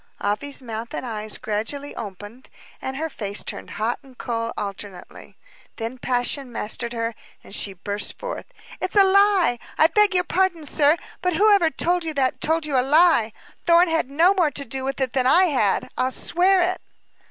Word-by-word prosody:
Afy's 265 Hz, +7 st, -3 dB
mouth 230 Hz, -1 st, -6 dB
and -, -, -4 dB
eyes 215 Hz, -2 st, 0 dB
gradually 225 Hz, +7 st, -4 dB
opened, 205 Hz, +4 st, -9 dB, 0.3 s
and 265 Hz, 0 st, -4 dB
her 320 Hz, +2 st, -2 dB
face 205 Hz, -9 st, -5 dB
turned -, -, -6 dB
hot 225 Hz, +3 st, -1 dB
and 265 Hz, -3 st, -19 dB
cold 230 Hz, -1 st, -3 dB
alternately. 200 Hz, -2 st, -8 dB, 0.4 s
Then 230 Hz, +3 st, -5 dB
passion 250 Hz, +2 st, -2 dB
mastered 235 Hz, +1 st, -3 dB
her, 230 Hz, -1 st, -2 dB, 0.3 s
and -, -, -14 dB
she 200 Hz, -, -3 dB
burst 200 Hz, +3 st, -3 dB
forth. -, -, -6 dB, 0.3 s
"It's 370 Hz, -, -3 dB
a 400 Hz, -, +8 dB
lie! 390 Hz, -, +4 dB, 0.2 s
I -, -, +6 dB
beg 415 Hz, +3 st, +3 dB
your 360 Hz, -, +4 dB
pardon, 365 Hz, -3 st, 0 dB
sir, 295 Hz, +3 st, +3 dB, 0.2 s
but 360 Hz, -2 st, 0 dB
whoever 400 Hz, -3 st, +4 dB
told 350 Hz, +2 st, 0 dB
you 320 Hz, -2 st, -4 dB
that, 260 Hz, -2 st, 0 dB
told 320 Hz, 0 st, +1 dB
you 280 Hz, -4 st, +1 dB
a -, -, +4 dB
lie. 290 Hz, -4 st, +4 dB, 0.4 s
Thorn 340 Hz, +1 st, +6 dB
had 325 Hz, -5 st, 0 dB
no 330 Hz, +7 st, +4 dB
more 355 Hz, -6 st, +2 dB
to 280 Hz, 0 st, -5 dB
do 265 Hz, +2 st, -4 dB
with 270 Hz, +1 st, -3 dB
it 260 Hz, -2 st, -1 dB
than 255 Hz, -1 st, +2 dB
I 345 Hz, +8 st, +6 dB
had; 255 Hz, -, +1 dB
I'll 255 Hz, -, 0 dB
swear 360 Hz, +7 st, +2 dB
it." 365 Hz, +1 st, -1 dB
270 Hz, 185 wpm, -23 LUFS, 230-345 Hz, 0.4 s, a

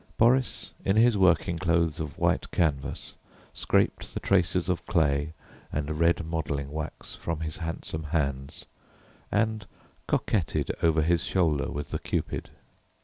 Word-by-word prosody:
Boris, 125 Hz, +2 st, +2 dB
in 95 Hz, -, +2 dB
his 115 Hz, +1 st, +5 dB
working 85 Hz, -3 st, +3 dB
clothes 85 Hz, -2 st, +1 dB
of 75 Hz, -2 st, -5 dB
white -, -, +1 dB
canvas, 75 Hz, -5 st, -1 dB, 0.4 s
scraped -, -, 0 dB
the -, -, -1 dB
traces 90 Hz, -2 st, +2 dB
of 90 Hz, -2 st, -1 dB
clay 75 Hz, -3 st, +1 dB, 0.4 s
and 75 Hz, +1 st, -2 dB
red 85 Hz, 0 st, +3 dB
modelling 75 Hz, -4 st, -2 dB
wax 80 Hz, +1 st, -6 dB
from 80 Hz, -2 st, -4 dB
his 80 Hz, -1 st, -3 dB
handsome 80 Hz, -2 st, -4 dB
hands, 70 Hz, -4 st, -2 dB, 0.7 s
and 110 Hz, -2 st, 0 dB, 0.4 s
coquetted 95 Hz, -8 st, 0 dB
over 80 Hz, -2 st, +3 dB
his 85 Hz, +2 st, +2 dB
shoulder 80 Hz, -6 st, +1 dB
with 75 Hz, 0 st, -5 dB
the -, -, -2 dB
Cupid. -, -, -3 dB
80 Hz, 135 wpm, -28 LUFS, 75-90 Hz, 0.7 s, his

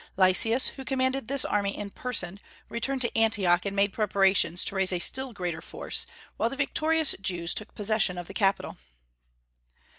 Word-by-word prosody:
Lysias, 195 Hz, +6 st, +4 dB
who 270 Hz, -, -10 dB
commanded 260 Hz, -2 st, -1 dB
this 275 Hz, +1 st, +1 dB
army 200 Hz, -1 st, -1 dB
in 205 Hz, -1 st, -6 dB
person, 200 Hz, -7 st, -3 dB, 0.3 s
returned 260 Hz, +3 st, -2 dB
to 235 Hz, -, 0 dB
Antioch 200 Hz, -5 st, +2 dB
and 200 Hz, -, -4 dB
made 200 Hz, 0 st, +1 dB
preparations 195 Hz, -4 st, +2 dB
to -, -, -3 dB
raise 190 Hz, -1 st, +1 dB
a 180 Hz, -, 0 dB
still 265 Hz, +8 st, +1 dB
greater 175 Hz, -6 st, -4 dB
force, -, -, -4 dB, 0.3 s
while 230 Hz, -, +1 dB
the 275 Hz, -, -6 dB
victorious 310 Hz, +2 st, +1 dB
Jews 175 Hz, -3 st, -1 dB
took 215 Hz, -, -3 dB
possession 210 Hz, -3 st, +1 dB
of 175 Hz, -, -5 dB
the -, -, -10 dB
capital. 195 Hz, -2 st, 0 dB
205 Hz, 170 wpm, -27 LUFS, 190-255 Hz, 0.3 s, Lysias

